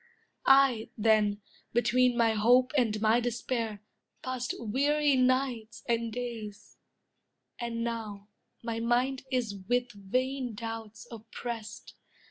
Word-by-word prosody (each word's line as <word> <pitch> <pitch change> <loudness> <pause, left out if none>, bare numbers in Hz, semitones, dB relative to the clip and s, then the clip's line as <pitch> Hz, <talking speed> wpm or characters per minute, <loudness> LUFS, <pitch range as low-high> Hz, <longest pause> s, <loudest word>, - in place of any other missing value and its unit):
I, 270 -4 +5
then, 210 -2 +2 0.3
between 245 +1 +3
my 230 -2 +4
hope 245 +4 +4
And 225 -6 +2
my 220 +2 +4
despair, 235 -3 -3 0.4
passed 255 -1 -3
weary 285 +5 +2
nights 255 -4 0
and 230 -1 0
days; 225 -4 -7 0.8
And 235 -1 -3
now, 215 -4 -5 0.4
my 230 -1 -3
mind 250 +3 0
is 245 -5 0 0.2
with 245 0 +1
vain 250 +5 -2
doubts 225 0 -7
oppressed. 230 0 -7
235 Hz, 105 wpm, -29 LUFS, 220-255 Hz, 0.8 s, I